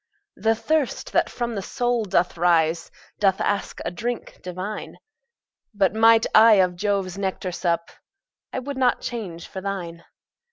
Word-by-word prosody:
The 225 0 +1
thirst 300 +3 -1
that - - +2
from 240 -1 -3
the 200 - -3
soul 240 +3 -1
doth 180 -2 +1
rise, 165 -1 +2 0.3
Doth 195 -2 +3
ask 205 -1 -1
a - - -2
drink 235 +7 -5
divine: 185 +4 -6 0.8
But 195 -2 +2
might 225 +1 +5
I 220 +1 +8
of 185 -3 +3
Jove's 195 -1 -1
nectar 190 -1 -2
sup, 170 -1 -1 0.6
I - - -4
would 275 +1 -4
not 255 -2 +2
change 190 -9 -5
for 190 - -7
thine. 175 -4 -5
195 Hz, 150 wpm, -23 LUFS, 180-225 Hz, 0.8 s, I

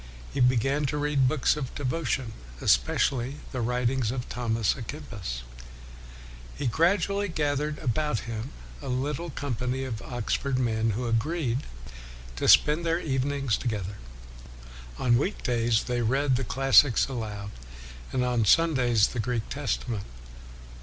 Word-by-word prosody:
He - - -2
be 125 +1 +5
gan 135 +5 +1
to 150 - -2
read 145 -3 +2
books 145 +1 +2
of 140 -4 -5
devotion, 130 -4 -2 0.3
especially 130 - +2 0.2
the 130 - -3
writings 125 0 0
of 125 0 -3
Thomas 115 -4 0
a 130 - -8
Kempis. 110 - -6 1.1
He 145 - -4
gradually 185 - +2
gathered 150 -2 -1
about 130 -3 -1
him 115 +2 -5 0.3
a 140 - -7
little 145 +6 -2
company 130 -2 -3
of 115 -4 -4
Oxford 125 +2 -2
men 115 -3 +1
who 125 - -2
agreed 125 +2 0 0.8
to - - -1
spend 150 +3 +6
their 165 0 +1
evenings 135 - 0
together. 105 -4 -3 1.0
On 120 -1 +3
week 190 +9 -2
days 115 -2 +1
they 125 -1 -1
read 135 +3 +2
the 130 - -1
classics 135 -1 +5
aloud, 105 -6 -5 0.6
and 125 -1 0
on 120 -2 +1
Sundays 125 - +4
the 120 - -5
Greek 115 0 -2
Testament. 120 -5 -3
125 Hz, 135 wpm, -27 LUFS, 115-145 Hz, 1.1 s, spend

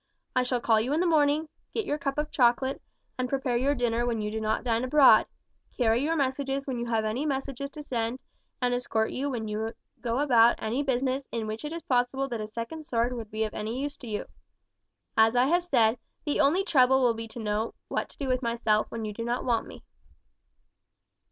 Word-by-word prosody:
I 255 - +4
shall 250 0 0
call 225 -2 +3
you 255 +6 -1
in 310 - +2
the 360 - +2
morning, 310 -1 +3 0.3
get 445 - -1
your 295 -3 -1
cup 275 0 -2
of 300 0 -2
chocolate, 260 +1 +2 0.4
and 250 0 -1
prepare 265 -2 0
your 270 +4 +2
dinner 240 -2 0
when 235 -2 -1
you 210 0 -2
do 220 0 -3
not 215 0 0
dine 230 -1 0
abroad, 260 -4 +6 0.5
carry 235 -1 +3
your 320 +3 +1
messages 275 -1 -1
when 255 -3 -3
you 240 - -3
have 225 -2 0
any 220 +6 -1
messages 275 -1 -3
to 300 +1 -9
send, 235 -3 -2 0.5
and 245 0 +2
escort 225 -3 0
you 280 +2 -2
when 230 -5 -3
you 220 +2 -3 0.3
go 235 0 -1
about 240 -5 +5
any 230 +5 -1
business 265 0 -1
in 230 -2 -2
which 215 +3 -5
it 300 - -4
is 335 -1 -6
possible 260 +1 +1
that 235 -3 -3
a 215 - -4
second 235 +8 -6
sword 235 +1 0
would 230 -3 -6
be 215 +1 -1
of 215 - -3
use 250 +7 -3
to 245 - -10
you. 210 -2 -3 0.9
As 220 +2 +5
I 245 +1 +5
have 345 +5 +2
said, 235 -7 +3 0.3
the 295 - 0
only 310 +7 +4
trouble 265 -6 +4
will 240 -2 +4
be 225 0 -6
to 225 - -10
know 215 +1 -2
what - - -2
to - - -21
do 275 - -3
with 255 0 +1
myself 230 -3 +1
when 225 -1 -4
you 210 - -4
do 230 - -5
not 240 +1 -2
want 235 -3 +1
me." - - -12
245 Hz, 220 wpm, -28 LUFS, 225-275 Hz, 0.9 s, abroad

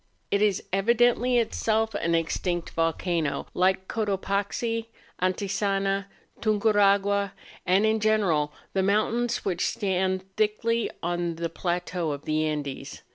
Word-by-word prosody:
It 200 - +2
is 210 -3 +2
evidently 240 +4 +3
itself 225 -1 +1
an 170 -4 0
extinct 170 +1 -1
volcano, 165 -1 0
like 190 +1 +2
Cotopaxi, 210 +2 -1 0.3
Antisana, 195 +1 0 0.3
Tunguragua, 200 -2 +3 0.3
and 190 +4 +4
in 220 0 +2
ge¬ 215 0 +3
neral 155 -7 +1 0.2
the 195 - +2
mountains 225 +5 +1
which 180 -3 0
stand 190 -3 0
thickly 220 +2 +1
on 175 0 -1
the 165 0 -3
plateaux 175 0 -2
of 140 0 -8
the 155 0 +1
Andes. 145 -3 -5
195 Hz, 120 wpm, -26 LUFS, 175-215 Hz, 0.3 s, and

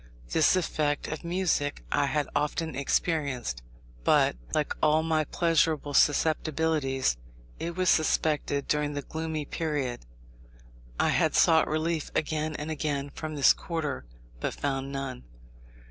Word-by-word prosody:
This - - +4
effect 150 -5 0
of 155 - -5
music 170 -5 0
I 145 -1 +2
had 150 0 0
often 160 +2 -1
experienced; 140 - -1 0.4
but, - - +4 0.2
like 150 -1 0
all 155 +1 +4
my 160 -1 +1
pleasurable 160 -3 +1
susceptibilities, 150 - +2 0.4
it 170 0 -4
was 185 0 0
suspended 150 -2 +1
during 150 -1 0
the 145 -1 -4
gloomy 160 -1 -4
period. 140 - -3 0.9
I - - +3
had - - +2
sought 160 -1 +5
relief 155 0 -1
again 155 0 -1
and 150 +2 -4
again 145 -2 -2
from 155 +1 -6
this 140 -2 +6
quarter, 155 - -4 0.3
but - - -2
found 135 -1 -2
none. 135 - -5
150 Hz, 130 wpm, -28 LUFS, 140-160 Hz, 0.9 s, this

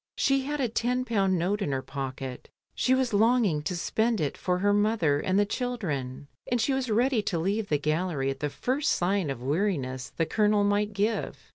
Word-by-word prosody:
She 275 -1 +2
had 295 +1 -3
a 260 - +1
ten 245 +3 -1
pound 195 -6 +1
note 195 +5 0
in 150 - -1
her 130 -1 -2
pocket, 135 -2 -6 0.2
she 260 - +2
was 260 -3 0
longing 215 -7 +3
to 180 +4 -3
spend 220 +5 0
it 145 -3 -1
for 180 -1 -1
her 205 +2 +2
mother 205 -9 +2
and 185 +5 0
the 205 - +4
children, 165 - -3 0.2
and 245 - +1
she 260 +5 +1
was 265 -2 -1
ready 240 +2 +2
to 200 -4 -2
leave 200 +5 -1
the 150 - +3
gallery 155 -2 -1
at 135 - -7
the 150 - -1
first 265 - 0
sign 185 -2 0
of 130 -3 -5
weariness 140 -5 -1
the 165 - -1
Colonel 210 +2 +2
might 205 +1 +1
give. 210 +3 -1
200 Hz, 205 wpm, -27 LUFS, 150-230 Hz, 0.2 s, the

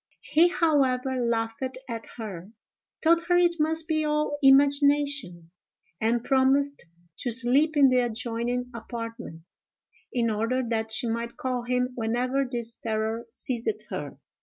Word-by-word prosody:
He 330 +3 +4
however 265 -7 +1
laughed 225 0 -1 0.3
at 230 -2 -6
her—told 220 - -3
her 355 0 +3
it 345 -1 +3
must 320 +1 0
be 310 -1 0
all 300 -1 -1
imagination—and 270 - +1
promised 270 -2 +1 0.3
to 245 - -2
sleep 260 +6 +4
in 275 -2 +6
the 255 0 +3
adjoining 240 +1 -2
apartment, 230 -6 -7 0.7
in 235 -2 0
order 230 +5 -1
that 225 -1 -1
she 220 +2 0
might 235 +1 -3
call 250 -2 -3
him 250 0 0
whenever 250 +4 -1
this 235 -2 -3
terror 220 +1 -3
seized 250 - -4
her. - - -5
250 Hz, 125 wpm, -26 LUFS, 230-285 Hz, 0.7 s, in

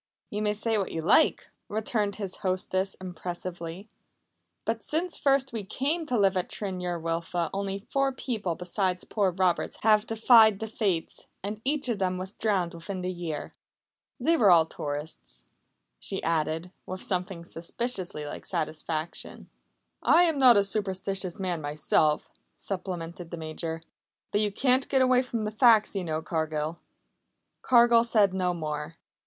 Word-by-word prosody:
"You 210 - -2
may 210 0 +1
say 220 0 0
what 195 - -2
you 165 - -3
like," 200 - +4 0.2
returned 210 -1 -1
his 195 -3 -3
hostess 185 +1 -1
impressively, 175 0 -6 0.8
"but 225 0 -1
since 335 +3 -1
first 275 -2 +2
we 220 -3 -3
came 295 - -2
to 250 - 0
live 195 -2 +3
at 185 - -1
Tryn 190 -3 -4
yr 175 -1 -2
Wylfa 165 +1 -2
only 195 0 -3
four 275 0 +2
people 220 -9 -3
besides 180 +1 -1
poor 205 -3 +1
Roberts 185 -1 0
have 215 0 +4
defied 225 -2 +6
the 220 - -4
Fates, 195 -7 -2 0.2
and 210 +2 -4
each 280 0 0
of 230 -4 -1
them 185 -1 0
was 185 +1 -5
drowned 195 -5 0
within 185 +3 -5
the 180 0 -2
year. 170 -4 -5 0.7
"They 330 - +3
were 210 -8 +5
all 170 -3 +7
tourists," 145 - -6 0.5
she - - -3
added 165 +2 0 0.2
with 185 0 -5
something 180 -2 -2
suspiciously 175 -2 -3
like - - -7
satisfaction. 155 +1 -3 0.5
"I 340 +2 +6
am 325 -5 +1
not 250 -4 +8
a 200 - +5
superstitious 195 -2 -1
man 180 -4 -2
myself," 150 +1 +1 0.2
supplemented 175 -3 -5
the 170 - -6
Major. 160 +1 -5 0.5
"But 205 - +2
you 210 -1 +1
can't 255 +5 +2
get 265 -2 +4
away 255 -1 +4
from 235 -3 -3
the 210 - -2
facts, 220 -1 +5
you 195 - -1
know, 160 -1 -2
Cargill." 160 0 -2 0.8
Cargill 235 -1 +6
said 210 -5 +4
no 185 -1 +1
more. 150 -1 -4
190 Hz, 155 wpm, -28 LUFS, 170-220 Hz, 0.8 s, not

